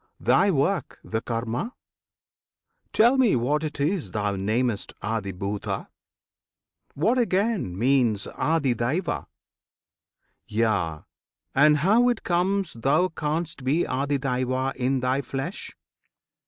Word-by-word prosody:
Thy 200 - +4
work, 170 0 0
the 110 0 -3
KARMA? 115 - -3 1.2
Tell 240 +5 +4
me 240 - +4
what 140 +6 0
it 150 -2 -4
is 160 +4 0
Thou 105 -2 -1
namest 110 +3 -1
ADHIBHUTA? 100 -1 -3 1.1
What 225 - +2
again 200 - 0
Means 120 -3 +2
ADHIDAIVA? 145 +2 -1 1.2
Yea, 105 -8 0 0.5
and 150 +2 +5
how 215 +11 +4
it 240 - -1
comes 185 +1 0
Thou 145 +10 +2
canst 160 -2 -3
be 145 +7 +2
ADHIYAJNA 130 -1 -1
in 130 +1 0
thy 130 +2 +1
flesh? 140 +7 -5
135 Hz, 100 wpm, -25 LUFS, 115-175 Hz, 1.2 s, and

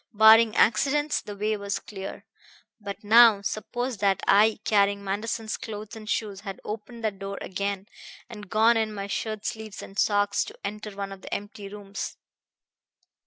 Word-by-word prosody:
Barring 220 +1 +7
accidents, 290 +6 +3
the 205 -1 -8
way 210 +2 0
was 200 -1 -2
clear. 195 -2 -8 0.5
But 205 +1 -7
now 220 -1 +7
suppose 240 +4 -3
that 195 -1 +1
I, 215 +2 +5
carrying 200 -1 +2
Manderson's 220 +3 -3
clothes 215 -1 -7
and 215 -1 -9
shoes, 205 -2 -2
had 195 -2 -7
opened 225 +2 -7
that 210 -3 -2
door 195 0 -5
again 200 +1 -3 0.4
and 210 -5 -10
gone 225 +2 +4
in 220 -1 -1
my 200 -1 -4
shirt 215 +1 -4
sleeves 220 -4 -5
and 195 0 -7
socks 205 -1 +2
to - - -11
enter 210 0 -5
one 200 0 -4
of 195 -1 -9
the - - -10
empty 205 0 -5
rooms. 200 0 -6
210 Hz, 165 wpm, -26 LUFS, 200-220 Hz, 0.5 s, Barring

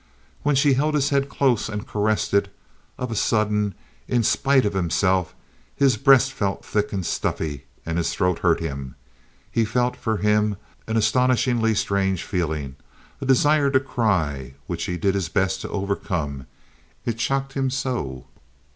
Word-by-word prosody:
When 145 -1 +2
she 140 +1 +4
held 150 +4 +1
his 145 -1 +1
head 140 0 +1
close 130 -7 +1
and 105 -1 -4
caressed 105 0 0
it, 100 0 +2 0.5
of 125 -2 -4
a - - -2
sudden, 105 -2 +1 0.3
in 120 -2 +1
spite 135 +3 +3
of 105 - 0
himself, 95 0 +1 0.4
his 135 -4 +3
breast 135 +1 +5
felt 100 -1 -2
thick 105 -1 -1
and 95 -3 -3
stuffy, 70 -4 -2 0.2
and 80 +1 -1
his 85 - 0
throat 90 -3 0
hurt 85 -2 +2
him. 70 -5 -5 0.6
He 115 - +2
felt, 120 +3 0
for 110 -2 -2
him, 105 0 +2 0.3
an 110 0 0
astonishingly 120 0 +2
strange 95 -3 0
feeling, 75 -7 -3 0.4
a 135 - -3
desire 145 +2 +4
to 135 -1 +4
cry, 80 - -1
which 85 -1 -3
he 90 - -3
did 95 +3 +1
his 95 -5 -1
best 95 0 0
to - - -6
overcome; 90 -8 -3 0.6
it 115 0 -2
shocked 135 +1 -1
him 135 -1 0
so. 125 - -3
105 Hz, 160 wpm, -23 LUFS, 90-130 Hz, 0.6 s, breast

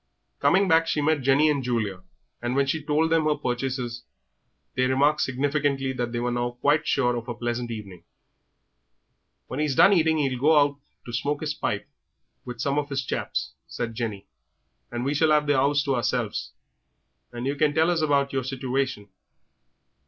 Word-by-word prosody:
Coming 195 +1 +3
back 165 -1 +4
she 155 - 0
met 150 0 +1
Jenny 135 +4 +4
and 145 -3 +1
Julia, 110 -6 -2 0.4
and 120 +1 -2
when 140 0 +3
she 155 +4 -1
told 150 +2 +1
them 165 -1 +3
her 150 -1 +2
purchases 125 -3 -3 0.7
they 125 0 +1
remarked 140 +3 +2
significantly 135 0 0
that 120 -2 -3
they 120 - -2
were 120 +1 -1
now 120 0 -2
quite 150 +4 +2
sure 125 -3 +2
of 120 0 -5
a 120 - -4
pleasant 120 0 -3
evening. 100 -6 -8 1.4
"When 130 - -6
he's 150 -3 0
done 200 - +7
eating 160 -3 +3
'e'll 135 -4 0
go 155 +4 +4
out 145 -1 +3 0.3
to 120 - -8
smoke 145 +5 -1
his - - -2
pipe - - -3 0.6
with 125 -2 -7
some 140 +4 +1
of 145 -1 -4
his 135 -2 -2
chaps," - - -3 0.2
said 115 -1 -4
Jenny, 110 -4 -4 0.7
"and 120 +1 -3
we 140 - 0
shall 155 +2 +3
have 150 -1 +4
the 145 -1 +2
'ouse 140 +2 +2
to 140 - 0
ourselves, 120 -3 -1 0.8
and 120 0 -5
yer 140 - 0
can 145 +1 +2
tell 160 +2 +3
us 170 -2 0
all 155 - +1
about 140 -1 +1
your 135 -1 0
situation. 130 -4 -2
135 Hz, 185 wpm, -25 LUFS, 120-150 Hz, 1.4 s, done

